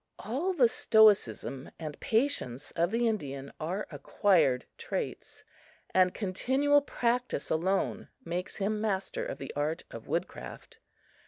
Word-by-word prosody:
All 285 - -2
the 265 -9 +5
stoicism 210 - +3
and 155 -3 -6
patience 220 - 0
of 170 0 +1
the 230 +3 +1
Indian 140 -10 -3
are 180 +7 -2
acquired 145 -2 +2
traits, - - -5 0.5
and 185 -1 +5
continual 265 +10 +2
practice 245 - -1
alone 185 +5 0 0.2
makes 175 +2 -3
him 210 +1 -1
master 215 - -1
of - - -4
the - - -7
art 150 +3 -1
of - - -9
wood - - 0
craft. - - -11
195 Hz, 130 wpm, -30 LUFS, 155-240 Hz, 0.5 s, the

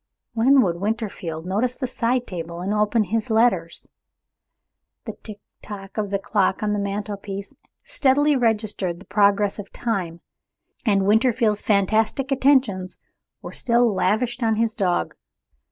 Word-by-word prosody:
When 260 +4 +5
would 170 -3 -1
Winterfield 200 -7 -3
notice 220 +7 0
the 265 - -2
side 245 0 -1
table, 170 -1 -6
and 195 +3 -1
open 210 +1 +2
his 220 +3 -2
letters? 220 -7 +2 1.2
The - - -4
tick 210 -2 -10 0.2
tick 195 -2 -9
of 210 -2 -2
the 200 - 0
clock 195 0 0
on 210 0 +1
the 205 - -1
mantel 200 +1 -3
piece 195 0 -7 0.3
steadily 290 +2 +2
registered 215 -7 0
the 190 - -14
progress 205 0 +2
of 200 - -8
time, 185 -8 -3 0.7
and 195 -2 +3
Winterfield's 220 0 +2
fantastic 220 +6 +1
attentions 255 -9 +2 0.5
were - - -8
still 235 -2 +2
lavished 235 +6 0
on 225 -1 +2
his 225 0 0
dog. 185 -5 0
210 Hz, 140 wpm, -23 LUFS, 195-235 Hz, 1.2 s, When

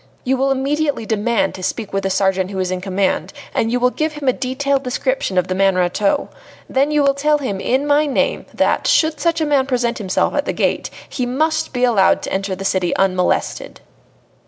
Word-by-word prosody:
You 265 0 +1
will 270 +1 +1
immediately 275 -1 0
demand 220 +1 0
to 185 - -9
speak 210 +2 -3
with 195 - 0
the 195 - -1
sergeant 190 -1 +1
who 195 - -6
is 185 -1 -1
in 185 0 -2
command, 190 +5 -1 0.2
and 225 - 0
you 250 - +1
will 250 +1 +3
give 310 +2 -2
him 295 -2 -6
a 255 - +4
detailed 270 +2 -1
description 255 -6 -2
of 180 0 +2
the 185 - -1
man 195 0 +2
Rateau. 185 +3 +1 0.4
Then 275 +2 +1
you 300 -1 +2
will 275 0 +4
tell 295 +2 +2
him 255 -9 -3
in 260 +7 0
my 295 +1 +3
name 275 - -1
that, - - +1
should 315 -1 +2
such 335 -1 +1
a - - +2
man 280 -3 +2
present 240 -3 0
himself 190 -3 0
at - - 0
the - - -2
gate, - - 0 0.2
he 250 -2 -3
must 315 +5 0
be 250 -1 -2
allowed 220 -6 +3
to - - -4
enter 195 0 -1
the 195 +1 -7
city 185 -2 0
unmolested." 185 -2 0
250 Hz, 215 wpm, -19 LUFS, 195-280 Hz, 0.4 s, a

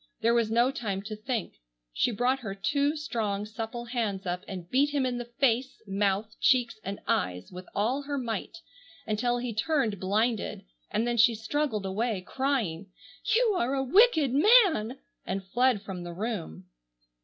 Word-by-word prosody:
There 230 +1 +3
was 230 -2 +2
no 240 +3 +3
time 200 -7 -3
to 215 +1 -5
think. 215 - -4 0.4
She - - +2
brought 245 +5 +1
her 205 -6 -5
two 285 +8 +1
strong 220 -9 -2
supple 225 +2 -5
hands 220 -5 -2
up 180 0 -2
and 180 -3 -7
beat 270 +8 +3
him 285 -2 0
in 245 -1 -1
the 240 0 -7
face, 260 -1 +1
mouth, 200 +2 0
cheeks, 245 -4 +3
and 200 +1 -5
eyes, 90 0 -1
with 180 0 -9
all 240 +7 +1
her 285 0 -3
might, 235 - -4 0.5
until 240 +3 0
he 240 -1 -3
turned 225 - 0
blinded; 215 - 0 0.2
and 225 - 0
then 240 0 0
she 230 +1 +5
struggled 220 -1 -1
away 205 +1 -1
crying, 230 -10 -1 0.5
"You 460 -2 +4
are 255 +4 0
a 270 - 0
wicked 315 - +4
man!" 315 - +5 0.3
and 190 +1 -4
fled 245 +1 +2
from 185 -3 -6
the 175 0 -6
room. 175 - -4
230 Hz, 165 wpm, -28 LUFS, 200-260 Hz, 0.5 s, she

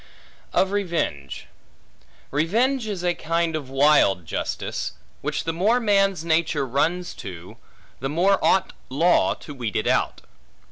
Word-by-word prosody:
Of 190 - +2
Revenge 170 - -2 0.9
REVENGE 225 - +1
is 195 -4 -4
a 175 -1 +2
kind 165 0 -1
of 145 -4 -5
wild 135 - +4
justice; - - -3 0.3
which - - -2
the 165 - -2
more 210 +9 +2
man's 195 -6 +2
nature 160 -3 +1
runs 165 +8 0
to, 90 -3 -9 0.4
the 135 - -3
more 180 +6 +2
ought 190 - +3 0.2
law 165 +7 +3
to 145 - -10
weed 120 -7 -4
it - - 0
out. - - +1
165 Hz, 135 wpm, -24 LUFS, 140-190 Hz, 0.9 s, wild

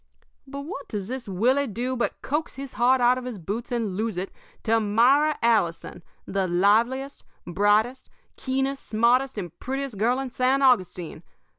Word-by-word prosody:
"But 280 +1 -6
what 285 -1 -7
does 205 -2 -5
this 255 -4 -5
Willie 255 +9 +2
do 245 +4 -3
but 240 - -3
coax 300 +3 -2
his 270 0 -8
heart 255 +2 +3
out 245 +1 +4
of 250 - -9
his 250 -4 -5
boots 205 +8 -5
and 225 -6 -2
lose 220 -1 -2
it 185 +2 -4 0.3
to 225 0 +2
Myra 250 +9 +3
Allison, 195 -7 +1 0.2
the 195 -1 -1
liveliest, 230 +10 +1 0.2
brightest, 210 +8 +1 0.3
keenest, 270 +1 -2
smartest, 240 +4 +2
and 175 -5 -6
prettiest 270 -5 -4
girl 245 +4 +2
in 270 -2 -4
San 260 +2 +1
Augustine. 185 -9 +1
240 Hz, 160 wpm, -25 LUFS, 205-265 Hz, 0.3 s, out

